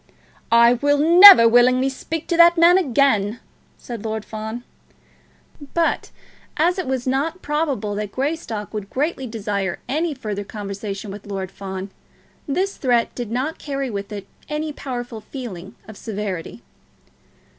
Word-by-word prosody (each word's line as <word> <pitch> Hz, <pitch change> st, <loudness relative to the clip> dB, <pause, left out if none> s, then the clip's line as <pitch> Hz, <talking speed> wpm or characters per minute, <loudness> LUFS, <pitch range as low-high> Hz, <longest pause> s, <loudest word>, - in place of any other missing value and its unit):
"I 235 Hz, +1 st, +6 dB
will 285 Hz, +4 st, +1 dB
never 340 Hz, -3 st, +9 dB
willingly 250 Hz, +3 st, +4 dB
speak 315 Hz, +4 st, -5 dB
to 340 Hz, -, +1 dB
that 340 Hz, 0 st, +7 dB
man 345 Hz, +3 st, +6 dB
again," 240 Hz, -, +1 dB, 0.4 s
said 235 Hz, -4 st, -8 dB
Lord 220 Hz, -1 st, -4 dB
Fawn. 220 Hz, +2 st, -6 dB, 1.1 s
But 335 Hz, -1 st, 0 dB, 0.5 s
as 350 Hz, +4 st, +2 dB
it 370 Hz, -, -3 dB
was 260 Hz, -2 st, -2 dB
not 285 Hz, +7 st, -2 dB
probable 290 Hz, -8 st, -2 dB
that 205 Hz, 0 st, -4 dB
Greystock 260 Hz, -7 st, -4 dB
would 205 Hz, -2 st, -5 dB
greatly 275 Hz, -1 st, -2 dB
desire 200 Hz, -5 st, -3 dB
any 310 Hz, +4 st, -1 dB
further 210 Hz, -5 st, -5 dB
conversation 200 Hz, 0 st, -6 dB
with 205 Hz, +1 st, -10 dB
Lord 195 Hz, -2 st, -5 dB
Fawn, 190 Hz, 0 st, -7 dB, 0.6 s
this 370 Hz, +8 st, -1 dB
threat 240 Hz, -3 st, +1 dB
did 240 Hz, -3 st, -5 dB
not 260 Hz, +7 st, -3 dB
carry 275 Hz, -3 st, -4 dB
with 200 Hz, 0 st, -6 dB
it 200 Hz, -2 st, -6 dB, 0.2 s
any 300 Hz, 0 st, -3 dB
powerful 245 Hz, -5 st, -6 dB
feeling 210 Hz, -5 st, -9 dB
of 220 Hz, -, -10 dB
severity. 195 Hz, -, -6 dB
240 Hz, 140 wpm, -21 LUFS, 205-290 Hz, 1.1 s, never